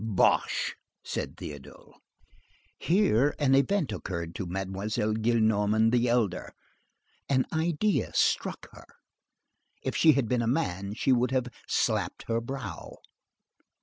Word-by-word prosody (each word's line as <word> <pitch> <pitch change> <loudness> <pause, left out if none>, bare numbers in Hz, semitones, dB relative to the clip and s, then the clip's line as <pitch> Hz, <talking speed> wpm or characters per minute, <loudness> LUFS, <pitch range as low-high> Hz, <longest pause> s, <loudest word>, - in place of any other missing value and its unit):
"Bosh!" 110 -4 +1 0.3
said - - -4
Théodule. 70 -2 -10 0.9
Here 145 - +2
an 140 -3 +2
event 145 +4 +2
occurred 85 -2 -5
to 90 - -5
Mademoiselle 95 +4 -2
Gillenormand 110 -1 +2
the 120 0 +2
elder,—an 120 +4 -3
idea 170 +6 0
struck - - +1
her. - - -15 1.0
If - - -2
she 160 -2 +6
had 135 -4 0
been 125 +1 +1
a 115 - -1
man, 105 - -1
she 135 - +1
would 125 0 +2
have 130 -1 0 0.2
slapped - - 0
her 115 0 -1
brow. 135 +2 -7
115 Hz, 115 wpm, -28 LUFS, 105-135 Hz, 1.0 s, she